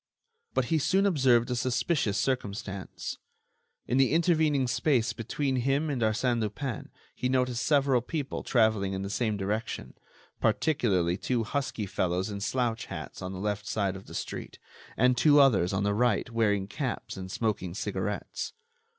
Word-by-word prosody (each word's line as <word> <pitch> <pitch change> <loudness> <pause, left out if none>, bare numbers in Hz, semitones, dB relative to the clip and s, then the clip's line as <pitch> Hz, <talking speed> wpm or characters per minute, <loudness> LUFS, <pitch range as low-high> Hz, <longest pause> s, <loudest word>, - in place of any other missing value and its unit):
But - - +2
he 160 - +4
soon 195 +7 +2
observed 130 -9 +3
a - - +1
suspicious 125 - 0
circumstance. 100 -5 -3 0.7
In 125 - 0
the 135 +1 +4
intervening 160 -5 +3
space 125 -1 +1
between 130 +4 -2
him 135 +5 +1
and 130 -4 -2
Arsène 115 +2 +1
Lupin 110 +3 -4 0.2
he 125 - -2
noticed 125 -2 +1
several 140 -4 +3
people 140 +2 -4
traveling 110 -5 +2
in 95 0 -3
the 100 - -4
same 110 -1 0
direction, 100 - -3 0.5
particularly 95 - +2
two 120 0 0
husky 120 -3 -2
fellows 90 +1 -1
in 100 0 -5
slouch 115 +1 -1
hats - - -7
on 95 - -4
the 95 - -6
left 105 0 -2
side 100 -3 0
of 95 - -10
the - - -9
street, - - -5 0.4
and 125 +1 +4
two 145 0 +6
others 105 -11 +5
on 95 +1 0
the 100 0 +1
right 115 0 +1
wearing 105 -4 +1
caps 130 +4 -4
and 95 -1 -7
smoking 95 -6 -2
cigarettes. - - -3
115 Hz, 160 wpm, -29 LUFS, 100-135 Hz, 0.7 s, two